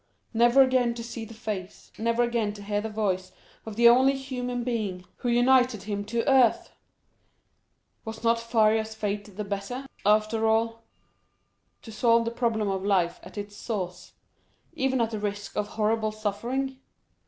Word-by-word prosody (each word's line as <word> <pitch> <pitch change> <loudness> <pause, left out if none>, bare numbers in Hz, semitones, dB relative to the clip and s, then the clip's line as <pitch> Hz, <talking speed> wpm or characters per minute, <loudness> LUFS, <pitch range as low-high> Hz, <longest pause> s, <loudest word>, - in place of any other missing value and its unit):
—never 240 +4 +6
again 255 -2 +2
to 235 - -6
see 230 -1 -6
the 225 - -11
face, 210 -5 -6
never 230 +2 +2
again 235 -3 0
to 205 -1 -10
hear 205 0 -1
the 220 - -4
voice 190 -4 -1 0.4
of 220 - -6
the 235 +1 +6
only 260 +3 +6
human 250 -2 -4
being 210 -7 -3
who 245 - -2
united 245 -2 +3
him 205 -1 -3
to 230 +4 -2
earth! 260 -4 +4 1.3
Was 220 0 -7
not 230 0 +3
Faria's 220 -1 +2
fate 205 -2 -4
the 210 - -2
better, 200 +6 -4 0.2
after 215 +2 +2
all—to 225 0 -5
solve 230 +1 +3
the 230 - -1
problem 230 -3 0
of 190 -1 -2
life 180 -4 +1
at - - -13
its 205 0 -6
source, 190 -6 -5 0.6
even 265 -1 0
at 230 -1 +1
the 215 - -3
risk 205 0 -4
of 210 0 -1
horrible 215 0 0
suffering? 240 +6 -3
225 Hz, 155 wpm, -27 LUFS, 205-240 Hz, 1.3 s, never